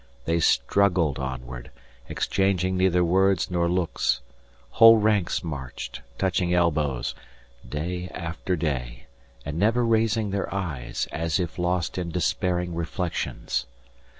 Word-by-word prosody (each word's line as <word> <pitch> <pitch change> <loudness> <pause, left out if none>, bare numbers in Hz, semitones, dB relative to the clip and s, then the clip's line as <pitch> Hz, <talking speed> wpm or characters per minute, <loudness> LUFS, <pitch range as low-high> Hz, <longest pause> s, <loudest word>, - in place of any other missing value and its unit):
They 85 +1 +1
struggled 90 -5 +2
onward, 65 -2 -6 0.4
exchanging 95 -1 0
neither 90 -1 +3
words 95 +1 +2
nor 85 -1 +1
looks 85 -8 0 0.5
whole 115 0 +8
ranks 105 -4 +1
marched, 70 -6 -6 0.2
touching 90 -2 0
elbows, 75 -8 +1 0.6
day 90 +6 -3
after 85 +2 -3
day, 65 -7 -3 0.4
and 75 +3 -4
never 115 +4 +3
raising 110 -2 +2
their 100 0 -2
eyes, 75 -12 -3
as 80 -1 -1
if 90 -1 -3
lost 90 0 0
in 85 -1 -3
despairing 90 0 0
reflections. 85 -6 -3
85 Hz, 115 wpm, -25 LUFS, 75-95 Hz, 0.6 s, whole